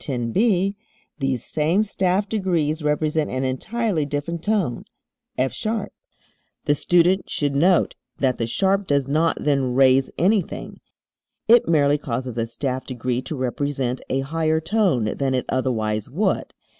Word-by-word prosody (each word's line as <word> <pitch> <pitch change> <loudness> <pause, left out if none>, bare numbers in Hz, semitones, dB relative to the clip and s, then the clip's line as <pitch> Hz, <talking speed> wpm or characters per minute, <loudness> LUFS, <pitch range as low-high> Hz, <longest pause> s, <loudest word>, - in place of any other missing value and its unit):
10 120 -4 -3
(b) 200 - +2 0.4
these 135 -3 -1
same 160 +7 +1
staff 195 -1 0
degrees 170 -7 0
represent 150 +1 0
an 130 +1 -2
entirely 195 - -1
different 145 +4 -3
tone 195 - 0 0.5
F[sharp]. 210 - -1 0.8
The 145 - +3
student 175 +5 +2
should 145 -2 -1
note 175 +5 +3 0.2
that 130 -2 0
the 115 - -1
sharp 195 - +1
does 140 -2 +1
not 155 +4 +1
then 135 -4 +1
raise 135 0 +4
anything; 190 +1 0 0.7
it 235 +1 +6
merely 145 -3 +3
causes 125 -3 -3
a 115 - -1
staff 130 +2 -3
degree 125 -1 -2
to 155 - -5
represent 130 0 -2
a 135 - 0
higher 160 +3 0
tone 175 - +1 0.2
than 135 -1 +1
it 125 - -1
otherwise 110 -5 -1
would. 190 +10 -1
145 Hz, 140 wpm, -22 LUFS, 130-180 Hz, 0.8 s, it